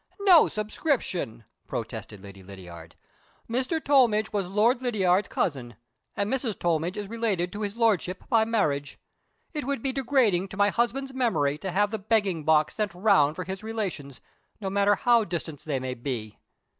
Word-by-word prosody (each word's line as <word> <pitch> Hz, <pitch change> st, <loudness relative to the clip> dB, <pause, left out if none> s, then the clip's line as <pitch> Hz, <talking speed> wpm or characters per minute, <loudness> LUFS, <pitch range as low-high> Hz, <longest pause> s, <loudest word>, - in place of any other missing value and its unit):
"No 370 Hz, -5 st, +7 dB
subscription!" 210 Hz, -, -2 dB, 0.2 s
protested 105 Hz, -2 st, -6 dB
Lady 100 Hz, -1 st, -11 dB
Lydiard. 90 Hz, -4 st, -12 dB, 0.5 s
"Mr. 255 Hz, +7 st, -1 dB
Tollmidge 245 Hz, -8 st, +3 dB
was 195 Hz, -3 st, -1 dB
Lord 225 Hz, +6 st, +2 dB
Lydiard's 200 Hz, -6 st, +2 dB
cousin; 125 Hz, -8 st, -2 dB, 0.4 s
and 200 Hz, -, 0 dB
Mrs. 245 Hz, -6 st, -1 dB
Tollmidge 170 Hz, +3 st, -1 dB
is 205 Hz, -1 st, -4 dB
related 205 Hz, -6 st, -1 dB
to 205 Hz, -, -5 dB
his 205 Hz, 0 st, -3 dB
Lordship 205 Hz, -6 st, +1 dB
by 225 Hz, -1 st, +4 dB
marriage. 155 Hz, -11 st, -1 dB, 0.6 s
It 300 Hz, -, -3 dB
would 275 Hz, -4 st, -2 dB
be 270 Hz, -, +1 dB
degrading 250 Hz, -8 st, +1 dB
to 190 Hz, -, -10 dB
my 205 Hz, 0 st, +4 dB
husband's 255 Hz, +4 st, -1 dB
memory 150 Hz, -, 0 dB
to 190 Hz, -, -4 dB
have 205 Hz, +3 st, +1 dB
the 220 Hz, -, -3 dB
begging 195 Hz, -6 st, 0 dB
box 155 Hz, -1 st, +3 dB
sent 210 Hz, -5 st, -2 dB
round 180 Hz, -7 st, +3 dB
for 180 Hz, -, -4 dB
his 190 Hz, +2 st, -6 dB
relations, 195 Hz, -, -5 dB, 0.4 s
no 195 Hz, -3 st, -4 dB
matter 200 Hz, +1 st, +3 dB
how 235 Hz, +1 st, +3 dB
distant 170 Hz, -5 st, -5 dB
they 145 Hz, -4 st, -1 dB
may 130 Hz, 0 st, -4 dB
be. 120 Hz, -4 st, -5 dB
200 Hz, 165 wpm, -26 LUFS, 155-230 Hz, 0.6 s, No